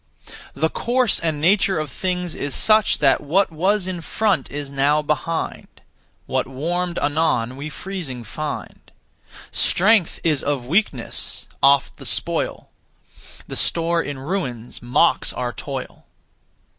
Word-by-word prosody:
The 160 +4 0
course 245 -2 +2
and 160 -3 -1
nature 190 +4 +3
of 155 -3 -3
things 180 +1 -2
is 140 -1 -4
such 215 -1 +4
that 135 -3 +3
What 170 +6 +2
was 190 +5 +1
in 185 -2 -4
front 210 +2 0
is 145 -1 -5
now 145 +2 +2
behind; 155 +2 -3 0.5
What - - -1
warmed 170 +6 -2
anon 145 -5 +1
we 145 +3 -6
freezing 160 -9 -6
find. 150 +7 -6 0.6
Strength 200 -1 +3
is 155 -4 +2
of 140 -4 -1
weakness 150 - -1 0.2
oft 140 -1 +4
the - - -4
spoil; - - +1 0.8
The - - -6
store 170 0 +1
in 145 -3 -5
ruins 130 - -4
mocks 125 +7 +2
our 125 -1 -3
toil. 135 -3 -7
155 Hz, 130 wpm, -22 LUFS, 140-180 Hz, 0.8 s, such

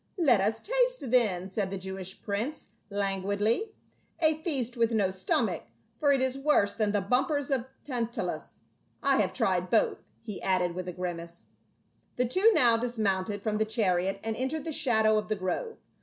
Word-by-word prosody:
Let 260 - +4
us 220 +3 0
taste - - 0
then," 200 -8 +3
said 195 -1 -1
the 195 - -4
Jewish 190 0 -7
prince 220 +9 -3 0.2
lan 200 -1 -1
guidly. 205 - 0 0.5
"A 315 -1 +2
feast 270 -7 0
with 230 -1 +2
no 205 -4 +1
stomach 190 - 0 0.3
for 290 -2 +2
it 270 -2 +3
is 260 +1 0
worse 275 -8 +3
than 215 -2 0
the 205 -1 +1
bumpers 275 - 0
of 255 -3 +1 0.2
Tantalus. 240 -4 -4 0.4
I 275 -1 +4
have - - 0
tried 185 -6 0
both," 225 - +2 0.2
he 210 -4 -6
added 180 -2 +1
with 185 +1 -5
a - - -2
grimace. 170 -1 -6 0.7
The 250 - +1
two 375 - +4
now 240 - +5
dismounted 205 -4 -1
from 215 -1 -1
the - - +4
chariot 195 -4 0
and 225 0 -2
en 260 +3 -1
tered 315 +1 -4
the 320 - -3
shadow 220 -7 +3
of 210 - -6
the 215 - 0
grove. 210 - -3
220 Hz, 180 wpm, -29 LUFS, 195-265 Hz, 0.7 s, now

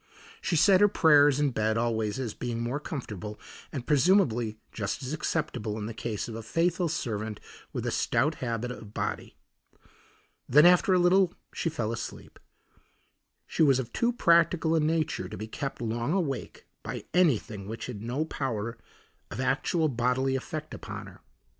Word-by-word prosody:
She 175 - 0
said 190 +4 +5
her 205 - +8
prayers 145 -7 +5
in 145 -2 +2
bed 110 -1 0
always 110 -2 0
as 125 -5 -3
being 120 -2 -4
more 120 +5 -2
comfortable, 105 - -6 0.3
and 130 -5 -5
presumably 135 - +3
just 105 +3 -3
as 130 +3 -4
acceptable 130 -9 -2
in 105 - -4
the 115 - -5
case 110 -1 -4
of 115 - -6
a 115 - -5
faithful 170 +8 0
servant 110 -8 -3 0.3
with - - -4
a - - 0
stout 130 +7 +1
habit 120 -1 -2
of 110 -4 -10
body. - - -3 1.1
Then 150 +6 +7
after 180 +2 +6
a 185 - +5
little 180 +1 +4 0.2
she 165 - -1
fell 120 -9 -2
asleep; 115 -1 -7 1.1
she - - -2
was 140 -4 +6
of 120 -3 -4
too 235 +1 +2
practical 170 -6 +3
a 165 - +4
nature 155 - 0
to - - -7
be 110 - -5
kept 135 +5 -5
long 115 +6 -1
awake 160 -9 -3 0.2
by - - -6
anything 115 - +1
which 115 +2 -5
had 115 -5 -6
no 125 +7 -2
power 115 -6 -3 0.5
of 110 - -7
actual 155 +5 +1
bodily 130 +1 +1
effect 155 +4 -5
upon - - -7
her. - - -14
130 Hz, 165 wpm, -28 LUFS, 115-160 Hz, 1.1 s, her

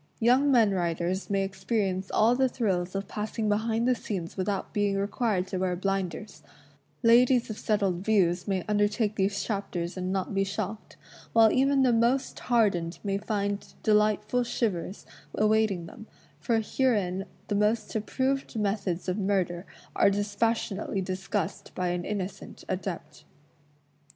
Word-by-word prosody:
Young 255 +5 +4
men 230 -5 +5
writers 175 0 -1
may 195 -1 +1
experi 195 +2 -1
ence 185 0 -3
all 225 +3 +4
the 260 0 +2
thrills 190 -7 -1
of 195 0 -3
passing 215 +2 -3
behind 225 +3 +1
the 255 - +4
scenes 190 -8 -5
without 195 +1 -2
being 205 -1 +1
required 200 -1 0
to 185 - -2
wear 185 -1 0
blinders; 195 +1 -3 0.6
ladies 240 +1 +5
of 215 - -7
settled 200 -4 +1
views 185 -4 +2
may 190 -3 0
imder 205 -1 +2
take 215 -1 -1
these 200 0 0
chapters 195 -4 -3
and 185 0 -2
not 190 +1 -2
be 195 0 +2
shocked; 200 +2 -5 0.4
while 225 -1 +6
even 270 +1 +3
the 250 -2 +4
most 235 +4 +1
hardened 195 -8 +1
may 195 -1 -1
find 205 -1 -3
delightful 215 +3 +2
shivers 205 -6 -2 0.3
awaiting 215 -4 +2
them, 215 +6 -11 0.3
for 230 -2 +1
herein 205 -6 0 0.2
the - - -2
most 210 +2 +1
approved 260 +6 -1
methods 200 -4 -1
of 185 +3 -1
murder 190 -2 -1 0.3
are - - +5
dispassion 205 +1 0
ately 195 -3 -3
discussed 190 0 -3
by 180 -1 -1
an 175 0 -2
innocent 195 -2 -5
adept. 175 -5 -5
205 Hz, 150 wpm, -28 LUFS, 190-220 Hz, 0.6 s, while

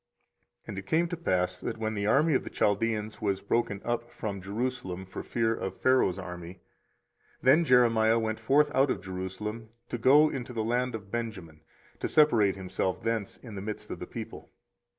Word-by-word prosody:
24:037:011 - - -33
And 100 - -5
it 95 - -9
came 165 +6 +2
to 175 - -2
pass, 90 - 0
that - - -4
when 110 0 -2
the 100 -1 -1
army 150 +8 +4
of 130 - +2
the - - -6
Chaldeans 105 +1 0
was 100 -2 0
broken 100 -1 -1
up 120 0 -2
from 110 -5 -5
Jerusalem 100 -3 -3
for 95 - -7
fear 115 -1 0
of 95 -4 -5
Pharaoh's 130 -8 +3
army, 90 -2 -7
24:037:012 - - -29 0.8
Then 155 +7 +5
Jeremiah 115 -4 +5
went 110 -1 -1
forth 145 +6 +3
out 135 +1 +4
of - - 0
Jerusalem 95 +4 -5 0.2
to 120 - -3
go 145 +6 +6
into 125 -2 -5
the 110 -2 -1
land 125 +2 0
of 100 -3 -9
Benjamin, 95 -10 -5 0.4
to - - -1
separate 115 -11 +4
himself 95 -1 -2
thence 115 -3 -2
in 115 -4 -11
the 100 - -5
midst 105 +1 -6
of - - -5
the - - -6
people. - - -8
110 Hz, 190 wpm, -29 LUFS, 95-125 Hz, 0.8 s, go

